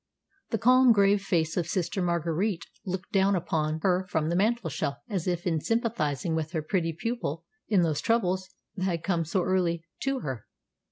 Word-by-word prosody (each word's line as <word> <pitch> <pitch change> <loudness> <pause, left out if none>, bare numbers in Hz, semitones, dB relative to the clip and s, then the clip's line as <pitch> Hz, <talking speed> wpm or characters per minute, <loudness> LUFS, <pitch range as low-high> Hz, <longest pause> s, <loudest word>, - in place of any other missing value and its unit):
The 225 - 0
calm, 255 +2 +6
grave 200 -1 +4
face 165 -4 0
of 175 - 0
Sister 190 +1 -1
Marguerite 170 +2 0 0.2
looked 185 +2 -4
down 195 -1 +3
upon 160 -3 -1
her 185 0 +2
from 160 -2 0
the 170 - 0
mantelshelf 190 - 0
as 190 -7 -3
if 175 -1 0 0.2
sympathising 215 - 0
with 160 +1 -2
her 160 -2 -1
pretty 165 0 0
pupil 230 -9 -3 0.2
in 195 -5 +3
those 155 -3 0
troubles 190 -5 +1 0.3
that 185 - -2 0.2
had 170 -5 0
so 180 +2 +1
early 180 -2 +1
come 165 - -24
to 270 -1 -1
her. 130 -6 -5
180 Hz, 170 wpm, -28 LUFS, 165-200 Hz, 0.3 s, calm